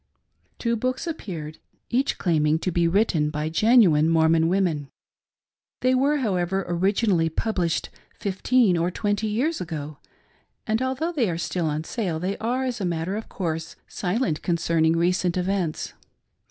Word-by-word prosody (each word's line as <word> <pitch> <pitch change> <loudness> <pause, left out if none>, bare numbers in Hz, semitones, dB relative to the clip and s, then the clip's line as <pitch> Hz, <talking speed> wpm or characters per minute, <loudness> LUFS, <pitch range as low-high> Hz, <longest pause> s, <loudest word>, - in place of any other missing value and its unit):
Two 235 -1 0
books 255 +5 -2
appeared, 170 - -6 0.3
each 260 +3 +1
claiming 155 -3 +2
to 180 +3 -2
be 170 0 +2
written 170 -5 +2
by 150 +1 -2
genu 220 +5 +5
Xll - - +3
PREFAgB. 150 - +3
ine 155 +2 +3
Mormbn 160 0 +4
women. 170 -6 0 0.9
They 255 0 +3
were, 275 +4 +3
however, 190 -6 0
originally 180 -1 +1
pub 220 +7 -2
lished 170 -2 0 0.3
fifteen 200 0 +2
or 170 +1 +1
twenty 205 +3 -1
years 260 +10 -1
ago; 155 -4 -6 0.7
and 220 +2 0
although 265 +6 -1
they 260 - +1
are 165 - -2
still 170 0 -2
on 155 +1 -2
sale, 180 -4 -3
they 190 +4 -2
are, 245 +4 -1
as 245 -3 -3
a - - -1
matter 170 +2 -2
of 220 - -6
course, 160 -3 -4
silent 180 -4 -1
concerning 165 -1 +1
recent 180 +1 +1
events. 180 -3 -2
180 Hz, 160 wpm, -24 LUFS, 165-225 Hz, 0.9 s, genu